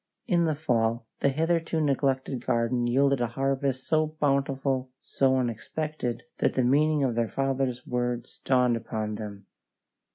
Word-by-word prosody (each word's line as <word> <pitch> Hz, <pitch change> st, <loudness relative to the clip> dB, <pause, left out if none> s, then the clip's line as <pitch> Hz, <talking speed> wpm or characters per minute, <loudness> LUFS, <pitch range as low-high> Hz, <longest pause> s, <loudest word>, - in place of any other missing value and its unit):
In 175 Hz, -5 st, +2 dB
the 155 Hz, -2 st, +1 dB
fall 115 Hz, -6 st, 0 dB
the 140 Hz, -, +3 dB
hitherto 165 Hz, +3 st, 0 dB
neglected 135 Hz, -3 st, 0 dB
garden 120 Hz, +1 st, +1 dB
yielded 135 Hz, +1 st, +3 dB
a 120 Hz, -, +2 dB
harvest 135 Hz, +1 st, -1 dB
so 155 Hz, 0 st, +2 dB
bountiful, 135 Hz, -2 st, 0 dB
so 130 Hz, -1 st, +1 dB
unexpected, 125 Hz, +1 st, -3 dB, 0.2 s
that -, -, +1 dB
the 130 Hz, -, +2 dB
meaning 150 Hz, +3 st, +3 dB
of 130 Hz, -3 st, +1 dB
their 115 Hz, -1 st, 0 dB
father's 135 Hz, -2 st, -1 dB
words 120 Hz, -1 st, -3 dB
dawned 125 Hz, -2 st, +3 dB
upon 110 Hz, -2 st, -3 dB
them. 105 Hz, -2 st, -7 dB
130 Hz, 140 wpm, -27 LUFS, 120-140 Hz, 0.2 s, the